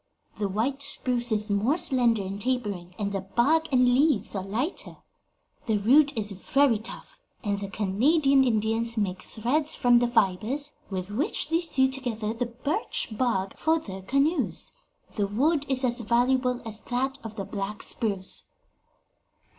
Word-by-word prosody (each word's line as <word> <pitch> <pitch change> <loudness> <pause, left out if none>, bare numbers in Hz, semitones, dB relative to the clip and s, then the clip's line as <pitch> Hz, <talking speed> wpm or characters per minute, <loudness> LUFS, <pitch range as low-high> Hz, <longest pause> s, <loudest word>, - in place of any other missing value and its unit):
The 205 -2 -1
white 245 +8 -1
spruce 250 -4 -1
is 210 -1 0
more 220 +10 +2
slender 240 - +2
and 195 +2 -4
tapering, 205 -8 -2
and 200 -1 -2
the 195 -1 -2
bark 275 +12 +1
and 250 -1 +4
leaves 265 -5 +2
are 195 - -2
lighter. 235 - -4 0.7
The 220 -2 +2
root 270 +6 +4
is 210 -1 -1
very 235 +4 +2
tough, 225 - -4 0.2
and 200 -2 -1
the 200 - -5
Canadian 270 - +3
Indians 225 0 0
make 190 -3 -1
threads 275 +10 -1
from 245 -2 +4
the 240 - +1
fibres, 235 +6 0 0.2
with 190 0 -4
which 290 - -1
they 330 - +3
sew 315 -6 +3
together 240 -5 -3
the 240 +1 -2
birch 280 - -3
bark 200 -6 -1
for 320 +1 +2
their 195 -11 -7
canoes. 275 - 0 0.5
The 205 -1 +1
wood 285 +8 +1
is 265 -1 0
as 240 0 +2
valuable 250 +2 +1
as 215 -1 -5
that 265 +4 -2
of 220 -1 -8
the 195 -3 -4
black 205 +2 -4
spruce." 200 -4 +1
235 Hz, 155 wpm, -26 LUFS, 205-270 Hz, 0.7 s, and